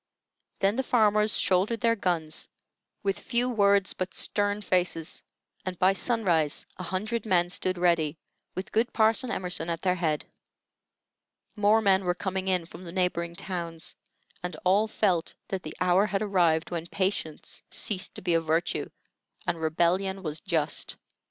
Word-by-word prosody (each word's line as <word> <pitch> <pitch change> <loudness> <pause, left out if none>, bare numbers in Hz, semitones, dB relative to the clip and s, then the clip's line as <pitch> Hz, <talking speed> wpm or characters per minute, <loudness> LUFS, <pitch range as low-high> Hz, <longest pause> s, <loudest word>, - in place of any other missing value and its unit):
Then 200 +3 +2
the - - +3
farmers 215 -4 +4
shouldered 195 +5 +2
their 230 0 +3
guns, 170 -6 -2 0.5
with 195 -1 0
few 245 0 0
words 200 -5 +3
but 185 0 -4
stern 205 0 +1
faces, 180 -4 0 0.4
and 185 -1 -4
by 185 +2 +4
sunrise 185 - +1
a - - -6
hundred 215 +5 -2
men 175 -4 +2
stood 185 0 -1
ready, 170 -3 +2 0.4
with 185 - -5
good 230 +3 +1
Parson 225 +3 +3
Emerson 180 -6 -1
at 165 -1 -3
their 180 -1 +3
head. 160 -4 -1 1.3
More 210 +1 +4
men 195 -1 +4
were 180 -1 +1
coming 190 0 -3
in 180 -3 +1
from 175 - -11
the 170 - -8
neighboring 170 -2 -1
towns, 170 -3 -4 0.5
and 180 -2 -4
all 200 +4 +4
felt 185 -6 0
that 190 -1 -2
the 155 - -8
hour 180 +3 +4
had 200 0 -1
arrived 175 -6 +2
when 170 -1 -3
patience 185 -5 -2
ceased 190 -2 -2
to - - -9
be 175 -2 +2
a 165 - +3
virtue 165 +2 0 0.6
and 165 - -1
rebellion 180 +4 +1
was 155 -2 -3
just. 155 -2 -1
185 Hz, 155 wpm, -28 LUFS, 170-205 Hz, 1.3 s, farmers